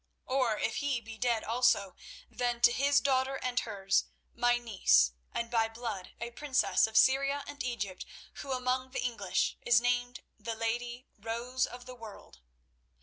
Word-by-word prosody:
Or 255 -5 +1
if 220 - -1
he 285 -4 0
be 225 -1 -11
dead 235 -3 +1
also, 215 -5 +2 0.3
then 240 -1 -2
to 240 - +7
his 280 +3 +3
daughter 265 0 +1
and 250 -1 -1
hers, 195 -3 0 0.3
my 240 0 +3
niece, 185 - +3 0.2
and 235 0 -3
by 225 -2 +3
blood 225 -5 -6
a 235 0 -5
princess 280 -2 +2
of 220 0 -1
Syria 275 +5 +4
and 285 -2 -6
Egypt, 205 -7 -4 0.3
who 275 - -6
among 255 0 -1
the - - -2
English 230 -6 -1
is 235 -1 +5
named 245 0 -1 0.2
the 230 -1 -4
lady 240 +2 -3
Rose 235 +4 -2
of 245 0 -10
the 255 - -9
World. 220 - -12
240 Hz, 160 wpm, -31 LUFS, 225-255 Hz, 0.3 s, to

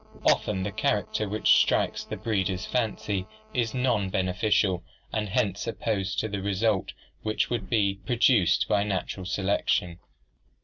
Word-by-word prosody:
Often 95 -3 +2
the 100 - -2
character 105 0 -1
which 110 +2 +4
strikes - - +1
the - - -6
breeder's 95 -4 -1
fancy 105 -5 -1 0.3
is 120 -1 0
non 120 -6 +1
beneficial 95 0 +1 0.3
and 105 -1 -1
hence 100 +1 0
opposed 100 -4 -2
to 110 -2 -3
a 100 - -3
result 100 +1 0 0.3
which 110 +2 -1
would 120 - -2
be 100 -4 +1
produced 120 -6 +3
by 100 - +2
natural 95 -2 -3
selection. 95 -3 0
100 Hz, 135 wpm, -27 LUFS, 95-110 Hz, 0.3 s, which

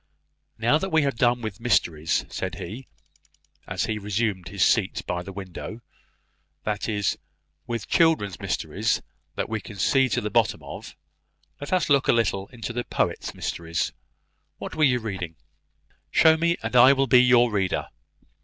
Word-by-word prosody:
"Now 120 +7 +3
that 190 - -3
we 160 -3 +3
have 140 -1 +1
done 120 +1 +2
with 110 -2 -5
mysteries," 85 -9 +1
said - - -4
he, 115 +9 -8 0.8
as - - -2
he 110 -2 -2
resumed 105 -3 -2
his 100 0 +1
seat 100 -5 +1
by 90 0 -2
the 95 +2 -8
window, 100 +4 -8 0.8
"that 105 +1 -2
is, 105 -2 0 0.5
with 115 -4 -4
children's 155 - +2
mysteries - - -1 0.3
that - - -2
we 110 -1 -3
can 105 - -10
see 130 +7 +3
to - - +1
the - - -4
bottom - - +1
of, - - -9 0.6
let 145 - -7
us 185 -1 +2
look 140 -2 +3
a - - +5
little 100 -4 0
into 120 0 -7
the 120 +1 -2
poet's - - -2
mysteries. 85 0 -3 0.6
What - - -7
were 155 - +3
you 125 -3 +3
reading? 95 -8 -5 0.7
Show 160 0 +5
me, 170 +2 +1
and - - -3
I 125 +3 +8
will 135 0 +2
be 125 -2 +6
your 120 -1 +5
reader. 95 -3 -1
115 Hz, 165 wpm, -25 LUFS, 100-130 Hz, 0.8 s, I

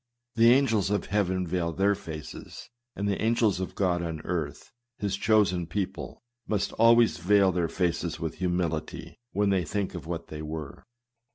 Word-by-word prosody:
The 115 0 +5
angels 115 -7 +3
of 105 0 0
heaven 95 -3 0
veil 85 -1 -1
their 100 +4 +3
faces; 80 - -8 0.2
and 100 +1 -2
the 100 - -1
angels 110 -4 +2
of 95 - -4
God 90 -3 +1
on 80 -2 -4
earth, 80 -4 -4 0.3
his 100 -4 -1
chosen 100 -4 +2
people, 95 +6 -4 0.2
must 105 -2 0
always 115 -2 +5
veil 95 +2 +4
their 85 -2 0
faces 85 -2 -1
with 80 -1 -4
humility, 90 -3 -2
when 100 0 +1
they 95 -2 +2
think 100 +3 -2
of 85 -3 -7
what 85 -1 -5
they 75 0 -6
were. 75 +1 -7
95 Hz, 165 wpm, -27 LUFS, 85-105 Hz, 0.3 s, The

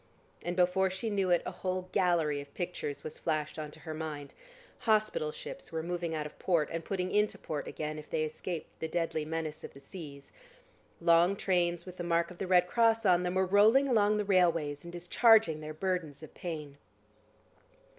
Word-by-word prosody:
And 175 +1 -2
before 185 +1 +3
she 190 +4 -3
knew 195 -2 +1
it, 175 -1 +3
a - - -3
whole 185 0 -3
gallery 165 -6 +2
of 140 0 -13
pictures 175 -5 -4
was 155 - -6
flashed 155 -1 -2
on 155 -1 -4
to - - -15
her 160 - -6
mind. 155 -3 -6 0.5
Hospital 230 - +1
ships - - -9
were 160 0 -3
moving 170 -1 -2
out 150 -1 -2
of 150 - -10
port, 170 -5 +1
and 165 0 -3
putting 185 0 -2
into 210 0 +2
port 150 -2 -5
again, 155 0 -4
if 150 - -12
they 160 -1 0
escaped 160 +2 -5
the 160 - -2
deadly 160 -2 -1
menace 160 -1 -4
of - - -9
the - - -11
seas; 140 -1 -10 0.7
long 170 +3 +4
trains 175 -3 0
with 180 -1 -10
the 175 - -4
mark 170 0 +1
of 175 - -12
the 190 - -3
Red 180 -1 +5
Cross 225 +3 +2
on 180 -2 +5
them 180 0 -2
were 190 0 +3
rolling 215 +8 +5
along 210 -4 +3
the 210 - -1
railways, 165 -7 +2
and 170 - -8
discharging 175 -1 +4
their 155 0 -6
burdens 160 -3 -3
of 155 - -11
pain. 150 -5 -6
175 Hz, 195 wpm, -31 LUFS, 155-190 Hz, 0.7 s, Red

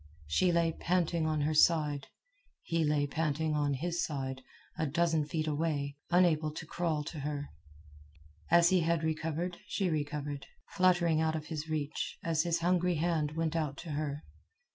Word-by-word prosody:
She 175 - +2
lay 170 -1 +2
panting 170 -1 0
on 155 -1 0
her 155 +2 +1
side. 150 -3 +3 0.6
He 165 -1 0
lay 150 -1 +2
panting 155 +1 -1
on 145 -2 +1
his 170 +5 -1
side, 135 -3 -3 0.3
a 160 - -1
dozen 160 +1 +1
feet 155 0 -1
away, 145 -2 -1
unable 170 -3 +3
to 165 - -6
crawl 160 -2 -1
to 150 +1 -6
her. 145 0 -4 1.0
And 170 - +7
as 170 0 +5
he 185 -2 +3
recovered 160 +2 -2
she 190 -4 0
recovered, 145 -2 -3 0.2
fluttering 175 -4 +3
out 160 0 +1
of 155 +1 -6 0.2
reach 150 -1 -3
as 165 -2 +1
his 170 0 0
hungry 180 0 +2
hand 155 -2 0
went 165 0 -1
out 150 -4 -1
to 165 - -5
her. 145 0 -3
160 Hz, 160 wpm, -32 LUFS, 150-170 Hz, 1.0 s, And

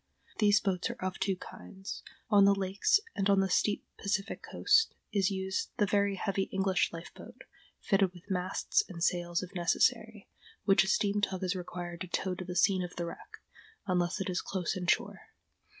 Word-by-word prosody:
These 210 -1 +5
boats 185 -4 -1
are - - -4
of 185 0 -3
two 195 0 +1
kinds. 190 +1 -9 0.3
On 200 -1 +7
the 200 0 +5
lakes 195 - +2 0.2
and 195 0 +1
on 200 -1 +5
the 190 -1 +1
steep 205 +3 +1
Pacific 200 0 -2
coast 445 +2 +2 0.2
is 195 -3 +3
used 190 -1 -2
the 205 - +3
very 200 0 +1
heavy 195 0 -1
English 190 -1 +1
life 165 0 -9
boat, 245 +3 -12 0.4
fitted 195 -3 +2
with 180 +1 -16
masts 185 0 +1
and 170 -3 -5
sails 175 -1 0
if 185 +2 -9
necessary, 175 -2 +1 0.4
which 195 -3 +5
a - - -4
steam 205 +1 +1
tug 190 -2 -1
is 185 +1 0
required 175 -1 -6
to 185 - -4
tow 185 +1 -1
to 180 - -6
the 180 0 -6
scene 185 0 +3
of 180 - -7
the 170 - -3
wreck, 170 - -10 0.4
unless 180 -1 0
it 195 - -2
is 180 -1 -1
close 185 -1 -2
in 180 -2 -4
shore. - - 0
190 Hz, 190 wpm, -31 LUFS, 180-200 Hz, 0.4 s, On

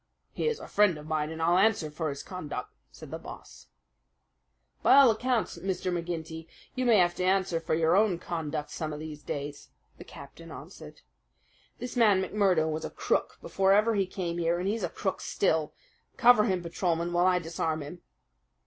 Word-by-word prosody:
"He - - -2
is 460 -1 -1
a - - -9
friend 205 -5 +3
of 150 - -10
mine, 155 -1 -1
and 160 0 -7
I'll 170 +2 +3
answer 190 -8 +2
for 155 +1 -3
his 140 0 -6
conduct," 180 -6 -6 0.2
said - - -12
the - - -5
Boss. - - -12 1.1
"By - - +6
all 275 -4 +8
accounts, 230 -4 -1
Mr. 185 0 -2
McGinty, 165 -1 -5 0.3
you 255 -1 -1
may 230 -3 +6
have 175 -2 +3
to - - -1
answer 185 -2 +1
for 165 - -1
your 165 +1 +3
own 200 -3 +3
conduct 160 -4 -4
some 155 -1 -4
of 150 - -6
these 155 -1 -8
days," 145 0 -6 0.3
the - - -8
captain - - -12
answered. - - -11 0.8
"This 245 +1 -6
man 215 -5 +4
McMurdo 190 -5 +2
was 155 +1 -4
a - - -4
crook - - -1
before 195 0 +2
ever 215 +3 +4
he 195 -3 +1
came 175 -2 -4
here, 170 0 +1
and 180 +2 -2
he's 215 +3 -1
a - - -1
crook 190 - -3
still. 160 -6 0 0.5
Cover 240 -3 +6
him, 185 -5 -1
Patrolman, 170 0 -1
while 175 +1 +3
I 185 -1 +4
disarm 160 -2 -2
him." 160 +5 -10
175 Hz, 190 wpm, -28 LUFS, 160-200 Hz, 1.1 s, all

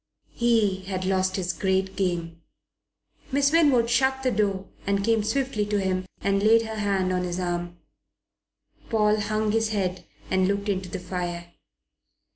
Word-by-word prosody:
He 225 -5 +2
had 185 -1 -3
lost 185 0 +1
his 180 -2 -1
great 190 +1 0
game. 170 -3 -2 0.9
Miss 280 +1 +3
Winwood 285 -8 +4
shut 265 +2 +1
the 255 - +2
door 200 -3 0 0.2
and 200 0 +1
came 225 -1 +3
swiftly 260 0 -1
to 205 0 0
him 185 -1 -1
and 200 0 +1
laid 225 +2 +5
her 220 -1 -5
hand 195 -3 0
on 180 - 0
his 180 0 -3
arm. 175 -1 -3 1.1
Paul 215 -1 +3
hung 215 0 0
his 225 0 +1
head 185 -4 -2 0.3
and 190 0 +3
looked 200 +1 -1
into 190 -2 -2
the 190 - -4
fire. 175 -2 -5
195 Hz, 155 wpm, -25 LUFS, 185-220 Hz, 1.1 s, laid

